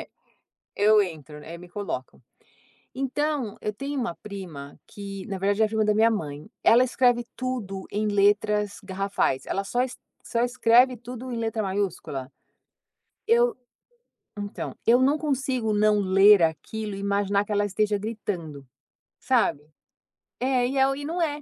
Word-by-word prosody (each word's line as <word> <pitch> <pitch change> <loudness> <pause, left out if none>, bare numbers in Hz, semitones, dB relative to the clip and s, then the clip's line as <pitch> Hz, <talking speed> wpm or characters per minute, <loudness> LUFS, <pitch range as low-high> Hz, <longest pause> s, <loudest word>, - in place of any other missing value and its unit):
É, - - -9 0.7
eu 210 +1 +5
entro 155 -5 -6
eh, 165 +2 -8
me 180 - -12
coloco. 185 -10 -5 0.7
Então, 270 -3 -2
eu 210 - -2
tenho 275 +6 -4
uma 235 -9 -2
prima 175 -9 -9
que 195 -2 -8
na 195 - -4
verdade 200 +3 +1
é - - +6
a - - 0
prima 220 0 0
da 210 - +3
minha 225 +2 +5
mãe, 150 -5 -4
ela 240 +2 +6
escreve 245 -1 +2
tudo 220 -7 -4
em 215 +1 -1
letras 205 0 +2
garrafais, 195 -8 -1
ela 195 - -2
só 245 +5 -1
es 255 -1 -5 0.3
só 235 - -1
escreve 245 +1 +4
tudo 245 +2 -8
em 235 - -3
letra 225 -1 -1
maiúscula. 190 -9 -3 1.0
Eu, 475 +1 +3 0.8
então 205 0 -5
eu 240 +2 +5
não 280 +4 +3
consigo 265 -6 -1
não 210 0 +3
ler 195 0 +6
aquilo 210 +6 -2
e - - -6
imaginar 200 0 +1
que - - -8
ela 205 0 +2
esteja 205 +1 0
gritando, 180 - -5 0.5
sabe? 145 +1 +1 0.8
É, 255 -1 +1
e 270 +2 -3
é 265 - +5
o 270 - 0
e 285 - -6
não 340 +4 -2
é. 300 -2 -1
210 Hz, 160 wpm, -25 LUFS, 195-250 Hz, 1.0 s, é